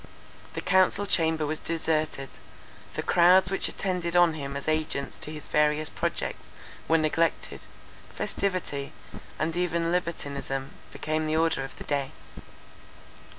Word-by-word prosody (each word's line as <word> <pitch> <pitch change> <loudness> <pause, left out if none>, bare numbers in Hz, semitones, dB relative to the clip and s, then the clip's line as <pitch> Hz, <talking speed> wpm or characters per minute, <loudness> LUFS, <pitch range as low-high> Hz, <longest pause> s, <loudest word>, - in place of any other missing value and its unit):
The - - -2
council 190 +2 +4
chamber 160 -4 +2
was 155 +1 -2
deserted; 155 -4 -1 0.7
the - - -2
crowds 180 +2 +5
which 195 - +2
attended 180 -3 -2
on 175 -2 +6
him 140 -2 -4
as 140 - -7
agents 155 -3 0
to 150 - -5
his 150 -2 -6
various 150 0 +2
projects - - -3 0.4
were 165 - +5
neglected. 165 +1 0 0.5
Festivity, 185 -8 -2 0.4
and 160 +1 -1
even 170 -1 0
libertinism, 140 -6 -2 0.2
became 155 0 -2
the 155 +1 +1
order 160 -4 +2
of 135 - -8
the - - -8
day. 140 -2 -2
155 Hz, 130 wpm, -27 LUFS, 150-170 Hz, 0.7 s, on